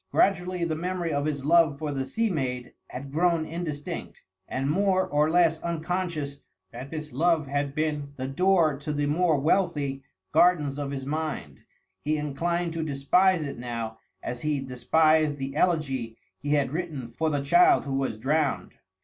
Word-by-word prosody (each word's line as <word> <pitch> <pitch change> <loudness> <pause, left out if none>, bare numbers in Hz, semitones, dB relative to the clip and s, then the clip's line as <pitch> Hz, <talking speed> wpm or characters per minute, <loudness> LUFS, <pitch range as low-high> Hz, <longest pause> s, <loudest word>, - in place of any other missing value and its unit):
Gradually 180 -2 +2
the 165 -2 0
memory 175 0 -2
of 145 0 0
his 140 -3 -2
love 160 -2 +4
for 150 0 -3
the 135 -2 -2
sea 225 -1 0
maid 125 -6 -3
had 135 +2 -8
grown 165 +1 +2
indistinct; 155 -3 -5 0.2
and, 135 +1 -2
more 185 +4 +2
or 150 +1 +2
less 165 -1 +3
unconscious 170 -3 -3 0.3
that 125 +3 -8
this 155 -2 -6
love 160 +2 +2
had 140 0 -2
been 150 -2 -2
the 130 -1 -4
door 170 +1 +3
to 150 +1 -4
the 145 0 0
more 160 +1 +2
wealthy 145 -3 +1 0.3
gardens 150 -6 +3
of 145 -1 -3
his 135 -1 -5
mind, 150 - -4 0.4
he 155 +1 +1
inclined 165 +4 -1
to 165 - -2
despise 155 +5 +3
it 140 -4 -6
now 115 -2 -5 0.2
as 120 0 -4
he 150 -2 0
despised 150 +4 +2
the 135 0 -5
elegy 135 -10 0 0.2
he 145 +1 -1
had 140 -3 +2
written 150 -7 -4
for 160 +4 +1
the 145 -2 -1
child 360 - +5
who 140 - -3
was 135 -5 -1
drowned. 145 +4 0
150 Hz, 165 wpm, -27 LUFS, 140-170 Hz, 0.4 s, child